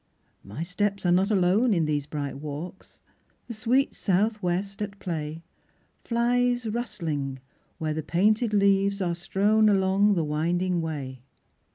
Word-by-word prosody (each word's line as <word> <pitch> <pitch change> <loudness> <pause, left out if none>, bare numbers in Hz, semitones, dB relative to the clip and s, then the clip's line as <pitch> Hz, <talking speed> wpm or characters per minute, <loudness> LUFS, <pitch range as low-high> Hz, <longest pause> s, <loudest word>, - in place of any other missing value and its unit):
My 105 +11 -6
steps 200 +3 -2
are 175 - +3
not 190 +3 +3
alone 205 +3 +3
In 165 -2 +1
these 145 -2 -1
bright 145 -2 -4
walks; 155 +5 -8 0.4
the 235 - -7
sweet 245 +5 +1
south 210 +3 0
west, 190 +3 -2
at 205 -1 -4
play 160 -3 -5 0.6
Flies, 245 0 +1
rustling, 160 - -3 0.4
where 155 -1 -2
the 155 - -3
painted 210 - +2
leaves 200 -1 +3
are 175 -3 0
strown 205 +5 +2
Along 195 +1 +3
the 170 - +1
winding 170 +4 0
way. 140 -6 -5
190 Hz, 140 wpm, -26 LUFS, 160-210 Hz, 0.6 s, are